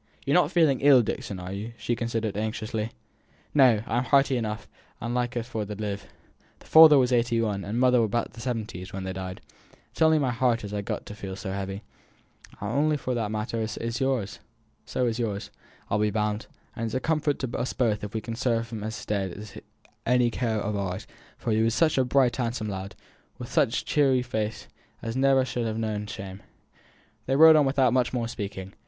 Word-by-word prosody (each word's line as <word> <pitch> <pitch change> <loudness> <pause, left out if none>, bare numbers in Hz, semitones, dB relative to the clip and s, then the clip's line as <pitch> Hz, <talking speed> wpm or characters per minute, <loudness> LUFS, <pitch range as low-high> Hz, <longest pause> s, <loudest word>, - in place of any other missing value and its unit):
You're - - +1
not - - +4
feeling 155 -7 +3
ill, 135 -3 +7
Dixon, 100 -2 -4
are 90 +1 -6
you?" 105 +4 -6
she 120 - -1
continued, 115 -3 -2
anxiously. 110 +1 -3 0.6
"No! 125 -7 +5
I'm 120 +2 0
hearty 135 -1 +3
enough, 110 -2 -3 0.3
and 115 +1 -3
likely 120 -1 -1
for 115 -2 -4
t' 105 0 -6
live. 100 -1 -4 0.5
Father 160 -2 +8
was 125 -1 +3
eighty 120 -1 +2
one, 105 -3 -1
and 110 +4 -2
mother 125 -1 +5
above 115 +1 -1
the 115 - -10
seventies, 110 -7 -4
when 95 0 -5
they 95 0 -4
died. 95 -1 -6 0.5
It's - - -12
only 160 0 +6
my 135 -4 +1
heart 120 -1 +1
as 100 0 -6
is 105 - -1
got - - -4
to - - -8
feel 100 -3 -7
so 95 0 -5
heavy; 95 +1 -4 0.8
and 140 +10 +1
as 150 - 0
for 125 - -2
that 115 -3 -1
matter, 110 +1 -2
so - - -6
is 115 +3 -3 1.2
yours, 105 -4 -3 0.4
I'll 105 - 0
be 105 0 +2
bound. 105 0 -1 0.3
And 115 - -3
it's 115 - -3
a - - +2
comfort 155 -1 0
to 130 -3 -4
us 125 - -2
both 110 -5 0
if 105 +1 -6
we 110 - -1
can 115 - -5
serve 115 -2 -1
him 110 -2 -5
as 110 +1 -4
is - - -10
dead 100 0 -3
by - - -9 0.5
any 125 -1 +4
care 115 -2 -1
of 105 0 -2
ours, 95 -2 -3 0.3
for 115 - -3
he 110 +1 +2
were 115 - +3
such 150 +5 +2
a - - +4
bright 125 -2 +2
handsome 115 -3 -2
lad, 95 0 -6 0.4
with - - -8
such - - +2
a - - -33
cheery 135 -4 +3
face, 110 -3 -3 0.4
as 115 +1 -3
never 135 0 +4
should 115 -2 -2
ha' 110 - -4
known 105 -2 -2
shame." 95 -1 -7 0.9
They 135 - +2
rode 160 +2 +9
on 150 -2 +5
without 135 -3 +3
much 125 -1 +2
more 120 -2 -1
speaking. 100 -3 -6
115 Hz, 205 wpm, -26 LUFS, 105-125 Hz, 1.2 s, rode